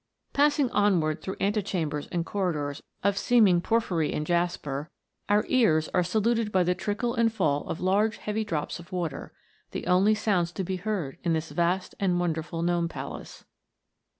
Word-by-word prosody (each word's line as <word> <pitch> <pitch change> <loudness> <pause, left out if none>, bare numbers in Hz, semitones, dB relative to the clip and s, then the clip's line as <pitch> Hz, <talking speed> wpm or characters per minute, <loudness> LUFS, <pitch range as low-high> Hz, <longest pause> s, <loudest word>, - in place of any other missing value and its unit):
Passing 285 -2 +3
onward 175 -7 +2
through 190 - -4
antechambers 185 -8 -1
and 170 -2 -1
cor 190 0 0
ridors 145 -2 -4 0.2
of 200 0 +2
seeming 210 -8 +4
porphyry 180 -7 +1
and 150 - -2
jasper, 170 -4 -1 0.4
our 205 +1 +3
ears 160 -12 +3
are 180 - +4
saluted 220 +4 +1
by 185 -2 +3
the 180 +1 +2
trickle 205 +6 -2
and 230 -2 +2
fall 155 -9 0
of - - -3
large 205 +4 +2
heavy 215 +1 -2
drops 165 -5 -3
of 170 +2 -13
water, 170 -6 -4 0.4
the - - -5
only 195 +4 +4
sounds 195 -6 +1
to 190 - -3
be 185 +1 -2
heard 180 -8 -3
in 170 -1 +1
this 160 0 -2
vast 180 +2 0
and 180 -3 +1
wonderful 165 -1 -2
Gnome 170 -1 +1
Palace. - - -8
180 Hz, 170 wpm, -27 LUFS, 165-210 Hz, 0.4 s, seeming